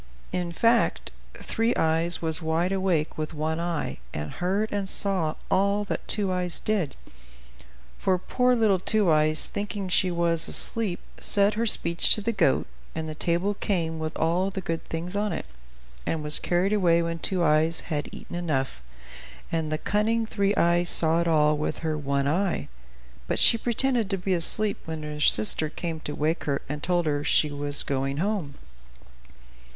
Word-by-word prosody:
In 180 -1 -3
fact, 230 +7 +1 0.2
Three 225 +2 -1
Eyes 165 +2 0
was 160 +1 -2
wide 165 +3 0
awake 185 -6 -1
with 155 +1 -4
one 160 +2 -2
eye, 170 - -3 0.2
and 75 0 -5
heard 195 +5 -2
and 200 -2 -2
saw 185 -7 +5 0.2
all 200 +2 +2
that 205 - -5
Two 200 -3 0
Eyes 180 -1 -1
did; 195 -10 -2 1.0
for 185 -1 +1
poor 250 +7 +1
little 215 -5 +2
Two 205 -1 +2
Eyes, 155 0 +4
thinking 200 -1 -5
she 185 0 +2
was 170 -1 0
asleep, 215 -7 -1 0.2
said 200 +1 +2
her 230 +2 -1
speech 170 -4 +4
to 215 - -5
the 230 - -1
goat, 175 -11 +1 0.3
and 160 0 -4
the 155 - -5
table 175 +5 -1
came 165 -6 -2
with 160 0 -4
all 175 +4 0
the 195 - -5
good 165 -3 -4
things 170 +4 -4
on 205 0 -1
it, - - -4 0.6
and 160 -2 -3
was 150 0 +1
carried 180 +4 0
away 170 -5 +3
when 165 0 -4
Two 180 +1 -1
Eyes 160 +1 +2
had 150 -3 -4
eaten - - -9
enough; 135 - -2 0.7
and 160 -2 -2
the 155 - 0
cunning 220 +6 0
Three 200 -2 -1
Eyes 175 0 +2
saw 165 +1 +3
it 170 - -1
all 150 -2 +3
with 155 - -3
her 155 -1 -1
one 140 -2 -1
eye. 180 +5 -1 0.6
But - - -1
she - - +5
pretended 235 -1 0
to 195 - -1
be 185 +1 -2
asleep 200 +4 +2
when 160 -1 -6
her 150 0 -6
sister 150 +3 +7
came 165 0 -5
to 150 -1 -6
wake 155 +3 -1
her 140 -2 -2
and 150 +1 -5
told 175 0 0
her 145 -1 -1
she 150 0 +2
was 145 0 -2
going 135 0 -2
home. 180 -5 -2
170 Hz, 175 wpm, -25 LUFS, 155-195 Hz, 1.0 s, sister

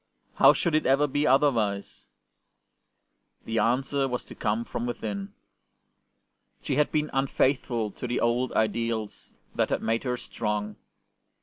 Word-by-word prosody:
How - - +7
should 170 - -1
it 155 - +2
ever 135 +3 +4
be 145 +1 0
otherwise? 115 -8 +1 1.4
The 115 0 -1
answer 135 +5 +1
was 125 -1 -4
to - - -11
come 110 +1 -1
from 120 - -4
within. 105 -4 -4 1.3
She 135 - -1
had 150 - +2
been 150 -1 0
unfaithful 130 -4 0
to 125 - -6
the 120 - -1
old 120 +2 +1
ideals 110 -1 -2 0.2
that - - 0
had - - -1
made 115 +1 0
her 125 -2 -1
strong. 105 -3 -3
120 Hz, 135 wpm, -27 LUFS, 110-135 Hz, 1.4 s, How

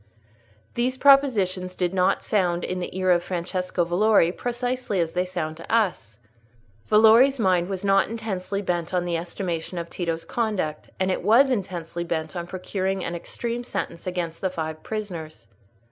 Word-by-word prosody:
These 250 +2 0
propositions 210 -10 +3
did 180 0 -1
not 185 -1 +2
sound 175 -4 +1
in 185 - -2
the 180 +1 -5
ear 185 -1 +2
of 175 -1 +4
Francesco 180 0 -2
Valori 175 0 +4
precisely 245 -3 -2
as 165 -1 0
they 180 +1 0
sound 160 -4 -4
to 165 - -9
us. 190 - 0 0.7
Valori's 225 +6 +6
mind 185 -5 +2
was 195 0 -4
not 195 0 +3
intensely 205 -3 -3
bent 175 -1 -2
on 175 -1 +1
the 175 -1 -1
estimation 170 0 -4
of 170 0 -5
Tito's 165 -2 -3
conduct; 200 -10 -2
and 190 0 +1
it - - -1
was 235 +8 +5
intensely 175 -6 -3
bent 160 -1 -3
on 170 -1 -4
procuring 190 +1 -2
an 170 - -3
extreme 235 +7 -4
sentence 175 -7 -5
against 175 -2 -3
the 190 - +1
five 160 -3 -5
prisoners. 170 - -6
185 Hz, 160 wpm, -24 LUFS, 170-215 Hz, 0.7 s, Valori's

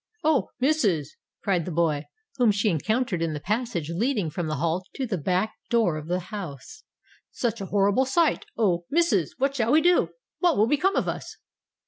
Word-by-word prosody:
"Oh! 305 -4 +2
missus," 225 - +1 0.3
cried 180 -6 +1
the 180 - -4
boy, 155 -3 +1 0.3
whom 245 -3 +4
she 205 +1 +2
encountered 215 - 0
in 165 -2 0
the 150 - -4
passage 205 - -2
leading 205 - 0
from 170 +1 -3
the 155 - -1
hall 165 +5 -1
to 265 - -2
the 220 -5 -2
back 185 +7 0 0.2
door 230 -9 +2
of 155 0 -6
the 180 +1 0
house; 180 - -7 0.5
"such 230 -3 -2
a 195 - -4
horrible 205 +6 +2
sight—Oh, 260 - +1
missus! 290 - +1
what 275 +1 0
shall 235 -3 +1
we 305 - +6
do?—what 355 - +1
will 210 - +5
become 295 - +2
of - - +1
us?" - - -5
210 Hz, 175 wpm, -26 LUFS, 170-265 Hz, 0.5 s, we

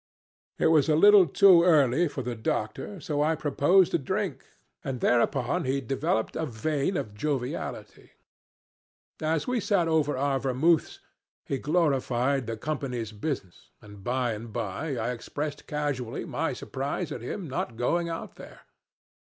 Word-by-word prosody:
It - - 0
was 155 0 +4
a 155 - +4
little 200 +2 +7
too 185 +3 +6
early 160 -2 +4
for 135 -3 -5
the 125 0 -3
doctor, 110 - -3
so 145 -2 -2
I 160 +2 +2
proposed 155 +5 +3
a - - +3
drink, 190 +7 -3 0.4
and 135 -4 -4
thereupon 120 +2 +1
he 135 +2 0
developed 130 -4 -1
a 160 0 -2
vein 145 - -1
of 105 - -4
joviality. 130 +2 -4 1.1
As 155 0 0
we 250 -1 0
sat 195 -5 +1
over 155 -4 +1
our 135 0 +1
vermouths 140 +6 +1 0.5
he 135 - -2
glorified 135 -5 +1
the 115 -1 -3
Company's 125 -4 -3
business, 105 - -5
and 105 -2 -14
by 125 0 0
and 110 +1 -8
by 115 +6 -3
I 115 +2 -1
expressed 145 +4 -5
casually 140 -5 -3
my 160 -1 -2
surprise 140 +6 -4
at - - -5
him 170 - -5
not 125 -4 -4
going 170 +8 0
out 165 - -6
there. - - -12
140 Hz, 150 wpm, -27 LUFS, 125-160 Hz, 1.1 s, little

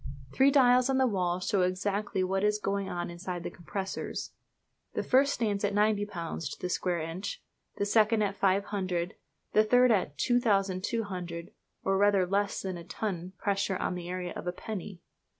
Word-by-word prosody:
Three 270 +1 +5
dials 255 -2 +5
on 265 - +2
the 265 - +4
wall 180 -6 0
show 190 +1 +1
exactly 190 +2 0
what 190 +1 0
is 210 0 +3
going 200 -1 -2
on 175 0 -3
inside 175 0 -5
the - - -4
compressors. 190 +3 -5 0.6
The - - 0
first 275 +2 +4
stands 210 -5 -1
at 205 0 +1
90 205 0 +2
lbs. 165 -5 -4
to - - -8
the 180 - -3
square 180 -1 0
inch, 170 - -5 0.3
the 200 - 0
second 215 +1 +3
at 200 -1 -1
500, 190 -2 +1
and - - -22 0.4
the 215 - +6
third 245 +3 +5
at 180 -9 +1
2200, 195 - 0 0.3
or 195 0 +2
rather 200 -2 +4
less 200 +2 0
than 190 -2 -3
a 170 - -8
ton 185 -2 -4
pressure 195 -1 0
on - - -1
the 175 -1 -6
area 180 -1 -3
of - - -6
a - - +1
penny! 190 -1 -7
195 Hz, 180 wpm, -30 LUFS, 180-210 Hz, 0.6 s, the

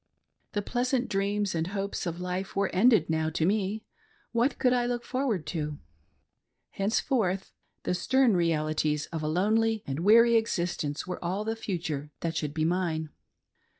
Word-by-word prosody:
The 205 - -1
pleasant 250 +2 0
dreams 200 0 0
and 165 0 -1
hopes 195 -1 -3
of 170 0 -4
life 180 +1 -4
were 195 -1 +1
ended 220 +4 +5
now 160 -1 0
to 160 0 0
me 205 +2 0 0.2
— 440 - -36
what 245 +3 +1
could 250 -2 +3
I 245 -1 +1
look 240 -1 -2
forward 255 - -1
to 150 -3 -3 0.5
.' - - -53
Henceforth 195 -2 0 0.3
the - - 0
stern 245 +5 +3
realities 155 -3 +1
of 165 -2 -3
a 155 - -2
lonely 215 +6 +2
and 135 +2 -3
weary 230 +5 +6
existence 170 -9 -1
were 180 0 -5
all 190 +5 -2
the 225 0 -1
future 165 -9 -4
that 165 -1 -2
should 150 -1 -2
be 155 -1 +1
mine. 165 -3 -1
190 Hz, 165 wpm, -28 LUFS, 160-225 Hz, 0.5 s, weary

